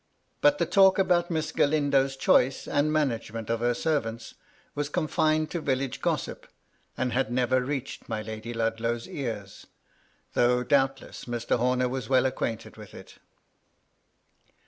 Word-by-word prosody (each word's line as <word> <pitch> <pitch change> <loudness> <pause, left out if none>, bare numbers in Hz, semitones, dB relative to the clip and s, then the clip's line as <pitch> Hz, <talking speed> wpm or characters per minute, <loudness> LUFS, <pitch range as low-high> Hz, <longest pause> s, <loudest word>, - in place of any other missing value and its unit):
But 290 0 +5
the - - +1
talk 190 -2 +5
about 180 -3 +2
Miss 160 -2 -2
Gralindo's 140 -2 +2
choice 135 0 +2
and 145 +2 +1
ma 155 0 +3
nagement 115 -3 -4
of 115 - 0
her 120 +1 +1
servants 115 -7 -2 0.4
was 145 0 -3
confined 155 -1 +1
to 170 - -3
village 135 -3 -2
gossip, - - -2 0.5
and 125 -1 -1
had 125 -2 0
never 125 +1 +2
reached 135 -2 -5
my 110 -1 -3
Lady 110 +1 -6
Ludlow's 115 0 -2
ears, 110 -8 -6 0.7
though 125 0 +3
doubtless 135 -1 0
Mr. 120 0 -1
Homer 125 +1 +2
was 125 -2 -4
well 130 -1 +4
acquainted 115 -3 -3
with - - -12
it. - - -13
130 Hz, 145 wpm, -27 LUFS, 115-150 Hz, 0.7 s, But